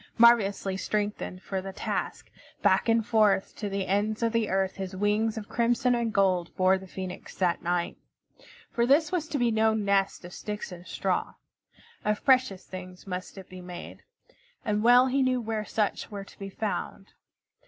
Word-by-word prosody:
Marvelously 210 Hz, -5 st, +4 dB
strengthened 205 Hz, -2 st, -3 dB
for 190 Hz, -1 st, -3 dB
the 195 Hz, +1 st, -6 dB
task, -, -, -4 dB, 0.3 s
back 195 Hz, +2 st, +3 dB
and 225 Hz, -1 st, +3 dB
forth 215 Hz, -4 st, +2 dB
to 210 Hz, -, -3 dB
the 195 Hz, -1 st, -2 dB
ends 210 Hz, +4 st, 0 dB
of 230 Hz, -, +2 dB
the 230 Hz, -2 st, +1 dB
earth 190 Hz, 0 st, 0 dB
his 190 Hz, -1 st, -5 dB
wings 210 Hz, +3 st, +1 dB
of 215 Hz, -1 st, -5 dB
crimson 240 Hz, +2 st, +2 dB
and 235 Hz, -2 st, 0 dB
gold 185 Hz, -4 st, +2 dB
bore 185 Hz, +1 st, +3 dB
the 190 Hz, -, -11 dB
Phoenix 185 Hz, 0 st, -7 dB
that 180 Hz, -2 st, +1 dB
night. 175 Hz, 0 st, -1 dB, 0.7 s
For 235 Hz, 0 st, +1 dB
this 300 Hz, +5 st, +4 dB
was 340 Hz, -4 st, -1 dB
to 300 Hz, -, -2 dB
be 240 Hz, -3 st, +2 dB
no 220 Hz, 0 st, +3 dB
nest 200 Hz, -3 st, +1 dB
of 175 Hz, -, -10 dB
sticks 210 Hz, -2 st, -5 dB
and 175 Hz, 0 st, -10 dB
straw. 185 Hz, +2 st, -1 dB, 0.7 s
Of 210 Hz, 0 st, -1 dB
precious 255 Hz, -8 st, +3 dB
things 185 Hz, -1 st, -9 dB
must 185 Hz, +1 st, -6 dB
it 190 Hz, -, -9 dB
be 185 Hz, 0 st, -10 dB
made, 180 Hz, -1 st, -9 dB, 0.6 s
and 210 Hz, 0 st, +1 dB
well 245 Hz, +3 st, +7 dB
he 265 Hz, +1 st, +1 dB
knew 255 Hz, -1 st, +2 dB
where 220 Hz, -2 st, -3 dB
such 210 Hz, -1 st, -1 dB
were 200 Hz, -2 st, -6 dB
to -, -, -17 dB
be 195 Hz, 0 st, -6 dB
found. 200 Hz, -1 st, -4 dB
205 Hz, 180 wpm, -28 LUFS, 190-230 Hz, 0.7 s, well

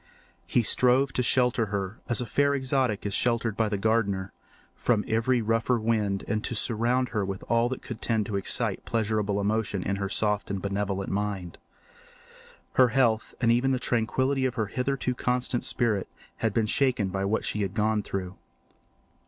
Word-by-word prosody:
He 120 Hz, -, +2 dB
strove 130 Hz, +4 st, +3 dB
to -, -, +1 dB
shelter 125 Hz, -2 st, +2 dB
her, 100 Hz, +1 st, -3 dB
as 120 Hz, -, +2 dB
a -, -, -2 dB
fair 140 Hz, +5 st, +2 dB
exotic 130 Hz, -6 st, 0 dB
is 100 Hz, -, -2 dB
sheltered 115 Hz, -2 st, +1 dB
by 110 Hz, -1 st, +1 dB
the 105 Hz, -, -1 dB
gardener, 100 Hz, -3 st, 0 dB, 0.4 s
from 110 Hz, -4 st, 0 dB
every 115 Hz, +2 st, +1 dB
rougher 115 Hz, +2 st, +1 dB
wind 105 Hz, -3 st, 0 dB
and 105 Hz, +1 st, -1 dB
to 120 Hz, -, -3 dB
surround 120 Hz, +3 st, +1 dB
her 105 Hz, -1 st, -1 dB
with 95 Hz, 0 st, -4 dB
all 115 Hz, +1 st, +2 dB
that 130 Hz, -, -5 dB
could 120 Hz, -, -7 dB
tend 110 Hz, -3 st, 0 dB
to 100 Hz, -, -4 dB
excite 100 Hz, -, +1 dB
pleasurable 105 Hz, -3 st, 0 dB
emotion 100 Hz, -2 st, -1 dB
in 100 Hz, 0 st, -1 dB
her 100 Hz, 0 st, -2 dB
soft 105 Hz, 0 st, 0 dB
and 100 Hz, -1 st, -2 dB
benevolent 100 Hz, 0 st, -2 dB
mind. 100 Hz, -3 st, -3 dB, 1.1 s
Her 130 Hz, -, +6 dB
health, 115 Hz, -3 st, +1 dB
and 115 Hz, -2 st, +3 dB
even 130 Hz, +3 st, +2 dB
the 130 Hz, -, 0 dB
tranquillity 130 Hz, +4 st, 0 dB
of 125 Hz, -, -1 dB
her 110 Hz, -, 0 dB
hitherto 125 Hz, +3 st, -1 dB
constant 125 Hz, 0 st, -1 dB
spirit, 110 Hz, -5 st, 0 dB, 0.3 s
had 115 Hz, -, 0 dB
been 110 Hz, +2 st, +1 dB
shaken 120 Hz, -3 st, +1 dB
by 95 Hz, +1 st, -2 dB
what 105 Hz, +3 st, 0 dB
she 105 Hz, -, -1 dB
had 100 Hz, 0 st, -2 dB
gone 110 Hz, 0 st, +1 dB
through. 95 Hz, -2 st, -5 dB
110 Hz, 175 wpm, -27 LUFS, 100-125 Hz, 1.1 s, Her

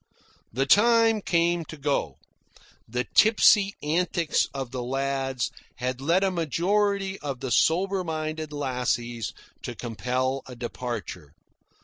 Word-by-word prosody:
The 135 Hz, +4 st, 0 dB
time 225 Hz, +5 st, +5 dB
came 170 Hz, -1 st, +1 dB
to 155 Hz, -, -9 dB
go. 140 Hz, -, -1 dB, 0.7 s
The 125 Hz, +2 st, -2 dB
tipsy 210 Hz, -2 st, +5 dB
antics 170 Hz, +1 st, +1 dB
of 135 Hz, -2 st, -5 dB
the 130 Hz, -, -4 dB
lads 135 Hz, 0 st, -2 dB, 0.2 s
had 125 Hz, +1 st, -3 dB
led 170 Hz, +7 st, +2 dB
a 195 Hz, -, +2 dB
majority 195 Hz, +4 st, 0 dB
of 140 Hz, -4 st, -5 dB
the 130 Hz, -, -4 dB
soberer 185 Hz, -, +2 dB
minded 155 Hz, -1 st, -4 dB
lassies 125 Hz, -5 st, -2 dB, 0.3 s
to -, -, -6 dB
compel 125 Hz, +3 st, -2 dB
a 125 Hz, -, -9 dB
departure. 120 Hz, -, -6 dB
145 Hz, 120 wpm, -26 LUFS, 125-180 Hz, 0.7 s, time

